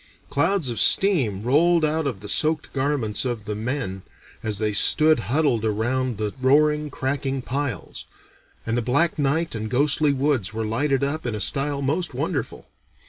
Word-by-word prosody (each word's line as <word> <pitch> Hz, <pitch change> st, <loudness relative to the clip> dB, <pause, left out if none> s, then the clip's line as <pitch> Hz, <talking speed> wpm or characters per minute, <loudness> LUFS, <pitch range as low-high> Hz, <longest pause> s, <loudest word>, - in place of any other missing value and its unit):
Clouds 165 Hz, 0 st, +1 dB
of 115 Hz, -, -3 dB
steam 125 Hz, -, +4 dB
rolled 160 Hz, +6 st, +3 dB
out 155 Hz, 0 st, -1 dB
of 110 Hz, -8 st, -5 dB
the 105 Hz, -, -8 dB
soaked 155 Hz, +5 st, 0 dB
garments 130 Hz, -6 st, -1 dB
of 120 Hz, -5 st, -4 dB
the 105 Hz, -, -3 dB
men, 110 Hz, -3 st, -4 dB, 0.4 s
as 110 Hz, -2 st, -2 dB
they 105 Hz, 0 st, -1 dB
stood 155 Hz, +9 st, +4 dB
huddled 135 Hz, -5 st, +1 dB
around 120 Hz, +3 st, -1 dB
the 105 Hz, -1 st, -3 dB
roaring, 150 Hz, +3 st, +3 dB
cracking 135 Hz, 0 st, -3 dB
piles, 135 Hz, -, -4 dB, 0.6 s
and 115 Hz, -, -1 dB
the 120 Hz, -, 0 dB
black 145 Hz, +8 st, +1 dB
night 160 Hz, +4 st, 0 dB
and 110 Hz, -1 st, -4 dB
ghostly 145 Hz, +4 st, +2 dB
woods 135 Hz, -7 st, -1 dB
were 110 Hz, 0 st, -2 dB
lighted 135 Hz, +5 st, 0 dB
up 150 Hz, +3 st, -2 dB
in 115 Hz, -, -2 dB
a -, -, -4 dB
style 140 Hz, +6 st, -1 dB
most 165 Hz, +6 st, -1 dB
wonderful. -, -, -4 dB
135 Hz, 165 wpm, -23 LUFS, 110-150 Hz, 0.6 s, steam